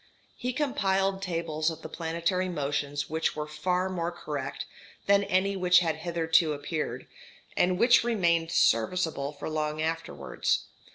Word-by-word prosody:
He 250 - -3
compiled 195 -9 0
tables 165 -4 -1
of 160 -1 -8
the - - -5
planetary 170 +3 -1
motions 145 -2 -2
which 160 +1 -1
were 150 0 -3
far 180 +4 -1
more 175 -2 -2
correct 145 -5 -5 0.4
than 200 0 +4
any 195 +1 +1
which 180 -1 +4
had 165 -2 0
hitherto 165 -2 +2
appeared, 145 -4 -4 0.5
and 180 0 +2
which 235 +4 +5
remained 170 -8 +1
serviceable 140 +4 +2
for 145 -1 -7
long 155 -1 -2
afterwards. 160 +1 -1
165 Hz, 135 wpm, -28 LUFS, 155-185 Hz, 0.5 s, which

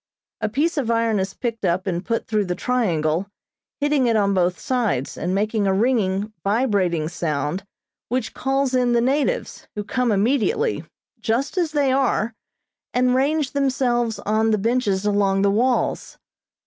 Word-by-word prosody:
A 215 - 0
piece 310 +8 0
of 245 -5 -2
iron 230 -2 +2
is 190 +1 -3
picked 230 -2 -4
up 180 +2 +1
and 180 -2 -2
put 230 +2 -2
through 215 -2 0
the 180 -1 -2
triangle, 180 -7 0 0.5
hitting 290 -3 +2
it 230 - +2
on 200 -2 +2
both 180 -1 +1
sides, 225 - -1
and 180 +2 -2
making 210 0 0
a 190 - +2
ringing, 210 -2 +1
vibrating 195 -7 +1
sound 160 +1 -2 0.5
which 255 +2 -2
calls 270 0 0
in 250 -1 +2
the 235 - +4
natives, 290 - -1
who 210 - -3
come 250 +2 0
immediately, 280 - +1 0.4
just 235 - -1
as 345 -4 0
they 285 -3 +2
are, 255 -4 +1 0.6
and 250 0 +3
range 280 +2 +1
themselves 250 -4 0
on 220 +1 +2
the 215 - +3
benches 210 -3 0
along 200 -1 +2
the 200 - +4
walls. 245 +4 0
225 Hz, 160 wpm, -22 LUFS, 195-255 Hz, 0.6 s, the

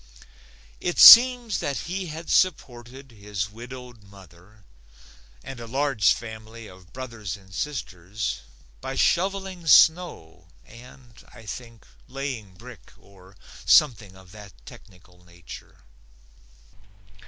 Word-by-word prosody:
It 175 - -4
seems 245 -2 +8
that 140 -2 -4
he 185 +2 -5
had 160 +1 -9
supported 130 -6 -2
his 100 -2 -6
widowed 120 +1 -12
mother 95 +1 -19 0.8
and 135 -2 -10
a 115 - -9
large 135 -3 +1
family 110 0 -7
of 90 -3 -17
brothers 115 -7 -8
and 95 -2 -20
sisters 105 - -5 0.4
by - - -6
shoveling 190 -1 -1
snow 160 - +2 0.2
and, 120 0 -17
I 115 -2 -16
think, 115 +1 -10 0.2
laying 130 -7 -7
brick 120 +2 -15
or 95 -1 -21 0.3
something 105 -5 +2
of 95 -1 -18
that 105 -2 -14
technical 90 -1 -18
nature. 85 -1 -15
115 Hz, 110 wpm, -23 LUFS, 100-135 Hz, 0.8 s, seems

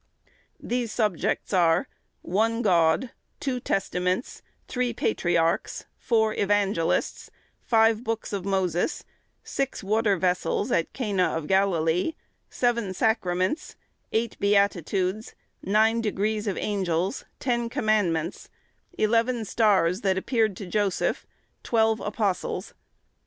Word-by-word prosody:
These 240 -2 -2
subjects 210 -4 -1
are,—one 195 +5 0
God; 175 +4 +3 0.3
two 260 -3 -2
Testaments; 185 0 -2 0.3
three 250 -1 -1
Patriarchs; 170 -7 0
four 220 -3 +1
Evangelists; 200 -5 0 0.3
five 225 0 +3
books 225 -2 -3
of 195 -2 -2
Moses; 190 - 0 0.4
six 275 -5 -3
water 210 0 +2
vessels 185 +5 0
at 165 - +1
Cana 200 -9 0
of 165 - -5
Galilee; 180 - +1 0.3
seven 235 -6 0
Sacraments; 185 - 0 0.4
eight 225 0 -1
Beatitudes; 200 0 +1 0.3
nine 220 +3 +2
degrees 210 0 -1
of 195 - -1
Angels; 190 0 -1 0.2
ten 240 -2 -1
Commandments; 205 - 0 0.5
eleven 230 +2 +1
stars 195 -4 +2
that 190 -2 +1
appeared 220 -1 0
to 200 - -6
Joseph; 200 0 -1 0.3
twelve 220 -1 +2
Apostles. 205 -2 -2
205 Hz, 100 wpm, -26 LUFS, 185-225 Hz, 0.5 s, God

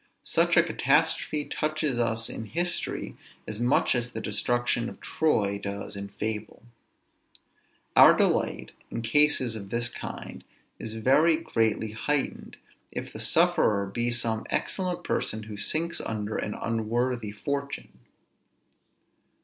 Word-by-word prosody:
Such - - +2
a - - +7
catastrophe 150 -1 +1
touches 155 -4 -1
us 115 -1 +1
in 110 - -5
history 175 +9 -2 0.3
as 110 0 -5
much 120 +3 +3
as 125 -1 -2
the 110 - -3
destruction 120 +3 0
of - - -12
Troy 100 -11 0
does 100 0 -5
in 100 0 -5
fable. 110 +1 -5 1.3
Our - - +9
delight, - - +1 0.2
in 115 - -4
cases 130 -1 +3
of 100 -3 -7
this 120 +2 +2
kind, - - -7 0.4
is 110 0 -6
very 150 +8 +4
greatly 110 -8 0
heightened, 140 +6 -2 0.3
if - - -6
the - - -7
sufferer 100 -2 +3
be 120 +5 -1
some 115 -2 0
excellent 180 -2 -1
person 110 -7 -1
who 105 -1 -8
sinks 155 +11 -1
under 110 -1 -3
an 105 - -3
unworthy 115 0 -1
fortune. 140 +6 -5
115 Hz, 125 wpm, -27 LUFS, 110-140 Hz, 1.3 s, Our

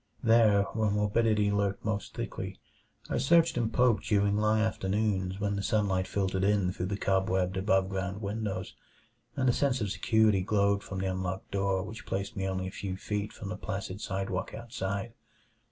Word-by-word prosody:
There, 110 -3 +5
where 110 -2 +1
morbidity 105 0 +2
lurked 100 -1 -1
most 105 -3 -2
thickly, - - -5 0.5
I - - -1
searched 165 +5 +4
and 115 -2 0
poked 125 -2 +3
during 100 -2 +2
long 105 +1 +2
afternoons 100 -3 0
when 100 -1 0
the 100 - -2
sunlight 100 -3 +1
filtered 95 -1 -1
in 100 -2 +2
through 90 - -3
the 100 +1 -2
cobwebbed 95 -1 +1
above 95 -1 +2
ground 95 +1 -3
windows, 100 -2 -4 0.6
and 130 -1 +1
a 125 - +5
sense 135 -1 +1
of 105 -4 -2
security 110 -3 +3
glowed 100 +1 +2
from 95 - -7
the - - -1
unlocked 95 0 -4
door 100 -1 0
which 110 +2 -9
placed 100 +1 -3
me 95 0 -2
only 95 -1 -2
a 95 - -4
few 95 -1 -5
feet 105 +1 -3
from 100 - -8
the 90 - -3
placid 95 +1 -5
sidewalk 95 -1 -3
outside. 110 -1 -4
100 Hz, 175 wpm, -30 LUFS, 95-110 Hz, 0.6 s, There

